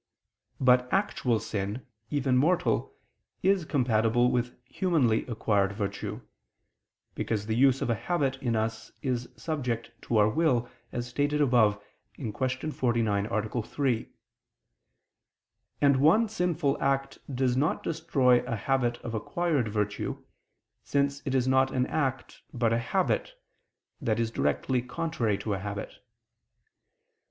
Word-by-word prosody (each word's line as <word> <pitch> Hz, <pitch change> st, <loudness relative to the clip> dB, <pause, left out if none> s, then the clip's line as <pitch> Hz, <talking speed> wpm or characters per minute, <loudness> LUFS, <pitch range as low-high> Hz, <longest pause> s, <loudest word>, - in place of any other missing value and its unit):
But 125 Hz, -1 st, +4 dB
actual 125 Hz, -, +1 dB
sin, 105 Hz, +4 st, -4 dB, 0.2 s
even 135 Hz, -3 st, +1 dB
mortal, 170 Hz, +7 st, +1 dB, 0.5 s
is 190 Hz, -3 st, +3 dB
compatible 120 Hz, -3 st, +2 dB
with 125 Hz, 0 st, -1 dB
humanly 135 Hz, -8 st, +1 dB
acquired 105 Hz, -4 st, +1 dB
virtue; 100 Hz, -1 st, -4 dB, 0.9 s
because 105 Hz, -2 st, -2 dB
the 110 Hz, 0 st, -1 dB
use 135 Hz, +1 st, +4 dB
of -, -, -2 dB
a 115 Hz, -1 st, -2 dB
habit 140 Hz, -7 st, +1 dB
in 120 Hz, -4 st, 0 dB
us 110 Hz, 0 st, -2 dB
is 125 Hz, -3 st, -2 dB
subject 125 Hz, -8 st, -3 dB, 0.2 s
to 115 Hz, -, +2 dB
our 105 Hz, 0 st, +5 dB
will, 125 Hz, -1 st, +2 dB, 0.2 s
as 120 Hz, 0 st, -3 dB
stated 145 Hz, +4 st, 0 dB
above 120 Hz, -7 st, +4 dB, 0.4 s
(Q. 115 Hz, -6 st, -4 dB
49, 120 Hz, -5 st, 0 dB
A. 110 Hz, +1 st, -1 dB
3): 125 Hz, 0 st, -1 dB, 1.7 s
and 140 Hz, -2 st, +5 dB
one 165 Hz, +12 st, +5 dB
sinful 175 Hz, -8 st, 0 dB
act 135 Hz, 0 st, 0 dB
does 125 Hz, -1 st, +1 dB
not 145 Hz, +5 st, 0 dB
destroy 125 Hz, -6 st, +2 dB
a 125 Hz, -2 st, -2 dB
habit 120 Hz, +1 st, 0 dB
of 115 Hz, -, -5 dB
acquired 145 Hz, +3 st, 0 dB
virtue, 105 Hz, -1 st, -2 dB, 0.6 s
since 140 Hz, 0 st, 0 dB
it 135 Hz, -, 0 dB
is 130 Hz, -1 st, +2 dB
not 130 Hz, 0 st, +4 dB
an 125 Hz, -1 st, 0 dB
act 130 Hz, -4 st, -2 dB
but 120 Hz, -2 st, +1 dB
a 115 Hz, -, +2 dB
habit, 190 Hz, -, 0 dB, 0.7 s
that 115 Hz, -4 st, 0 dB
is 115 Hz, -1 st, 0 dB
directly 125 Hz, +2 st, 0 dB
contrary 125 Hz, -5 st, -1 dB
to 105 Hz, +1 st, -3 dB
a 95 Hz, -, -2 dB
habit. 100 Hz, +1 st, -6 dB
125 Hz, 130 wpm, -28 LUFS, 115-140 Hz, 1.7 s, our